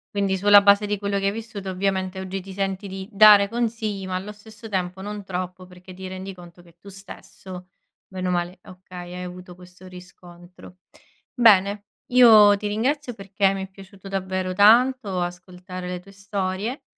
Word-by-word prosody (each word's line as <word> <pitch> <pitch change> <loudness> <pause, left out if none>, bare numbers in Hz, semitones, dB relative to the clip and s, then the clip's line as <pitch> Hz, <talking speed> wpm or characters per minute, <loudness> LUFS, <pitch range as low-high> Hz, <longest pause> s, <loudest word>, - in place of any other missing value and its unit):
Quindi 195 -1 0
sulla 205 +1 +6
base 200 +1 +4
di 205 0 -2
quello 200 0 -2
che 195 - -3
hai 200 - +2
vissuto 215 -4 -7
ovviamente 190 0 -2
oggi 190 +1 -5
ti 190 +1 -11
senti 195 0 -3
di 190 0 -7
dare 205 -1 +7
consigli, 220 -4 -3
ma 185 - -3
allo 195 +3 -5
stesso 215 +1 -13
tempo 185 -1 -3
non 205 0 -7
troppo, 185 0 -6
perché 180 0 -14
ti 190 0 -9
rendi 190 +1 -7
conto 175 -1 -15
che 170 -1 -22
tu 200 - -18
stesso 190 -1 -11 0.4
bene 185 -1 -4
o - - 0
male 175 +1 -3
okay, 180 -1 -11
hai 180 0 -6
avuto 180 0 -10
questo 180 +1 -16
riscontro. 180 0 -15 0.6
Bene, 205 -3 +3 0.3
io 220 -5 +7
ti 210 +1 -5
ringrazio 255 +5 -2
perché 195 -1 0
mi 195 - -4
è 190 - -9
piaciuto 195 0 -14
davvero 185 -1 -3
tanto 220 0 +4
ascoltare 180 +1 -7
le 180 0 -4
tue 195 +2 -17
storie, 200 +4 -4
195 Hz, 175 wpm, -23 LUFS, 185-205 Hz, 0.6 s, dare